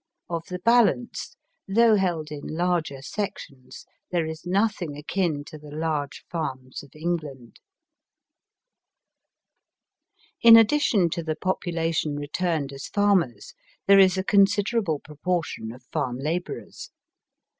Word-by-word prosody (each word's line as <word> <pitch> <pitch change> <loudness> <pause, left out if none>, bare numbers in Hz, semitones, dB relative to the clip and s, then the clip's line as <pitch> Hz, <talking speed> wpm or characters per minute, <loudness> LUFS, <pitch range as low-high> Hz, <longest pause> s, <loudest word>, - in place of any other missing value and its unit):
Of 165 -1 -3
the 180 - -4
balance, 235 +4 +2 0.3
though 225 +3 +4
held 170 -6 -1
in 150 -1 -6
larger 160 -5 -1
sections, 140 -8 -6 0.2
there 170 -3 0
is 160 +2 -7
nothing 190 -5 0
akin 155 -1 -1
to 155 +1 -11
the 150 0 -12
large 150 -2 -3
farms 130 -6 -5
of 145 - -15
England, 155 -7 -5 2.8
In 230 -1 +10
addition 225 - +3
to 170 - -2
the 160 -1 -3
population 165 -4 -1
returned 145 0 -2
as 135 - -7
farmers, 190 - +1 0.3
there 200 0 +7
is 190 -1 +5
a 190 - 0
considerable 200 -2 +2
proportion 155 -6 -3
of 125 +2 -13
farm 125 -1 -2
labourers. 160 +6 -5
165 Hz, 115 wpm, -25 LUFS, 145-195 Hz, 2.8 s, In